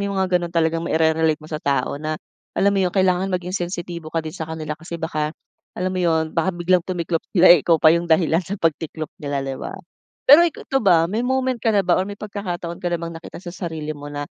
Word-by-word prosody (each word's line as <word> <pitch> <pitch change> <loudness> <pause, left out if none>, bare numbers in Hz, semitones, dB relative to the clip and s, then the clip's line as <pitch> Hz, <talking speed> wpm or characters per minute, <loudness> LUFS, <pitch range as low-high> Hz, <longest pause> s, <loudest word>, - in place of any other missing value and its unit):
sino 200 0 -2
mga 185 -2 +2
gano'n, 175 - -3
talagang 165 0 0
mai-re-relate 160 -1 +2
mo 155 0 -14
sa 155 - -3
tao 140 -2 -1
na, 155 0 -2 0.4
alam 200 +1 +3
mo 195 - +1
'yon? 180 -2 +1
Kailangan 185 0 +2
maging 180 -1 -3 0.2
sensitibo 170 -2 -6
ka 160 0 -2
din 155 - -5
sa 160 0 -6
kanila 160 -1 -4
kasi 165 +2 -7
baka, 155 -1 -3 0.4
alam 185 +1 -1
mo 185 - -2
'yon, 160 -2 +1
baka 165 +2 0
biglang 175 +1 +3
tumiklop 170 -2 -2 0.2
sila 175 0 +9
eh, 175 - +5
ikaw 165 +3 +3
pa 155 0 +6
'yong 170 +1 0
dahilan 165 0 +3
sa 190 +3 -5
pagtiklop 160 -2 -2
nila 140 -2 -2
'di 135 -1 -5
ba. - - -6 0.5
Pero 290 +4 +9
ik 320 - -12
ito 270 - 0
ba, 175 -6 +5
may 205 +7 -2
moment 260 0 0
ka 225 - 0
na 200 - +3
ba 175 - +2
or 190 - -3
may 205 - -7
pagkakataon 180 -5 -5
ka 175 - -1
na 175 - 0
bang 170 0 -6
nakita - - -10
sa 175 -1 -8 0.2
sarili 155 -2 -5
mo 145 -1 -9
na, 145 0 -4
170 Hz, 240 wpm, -22 LUFS, 160-185 Hz, 0.5 s, sila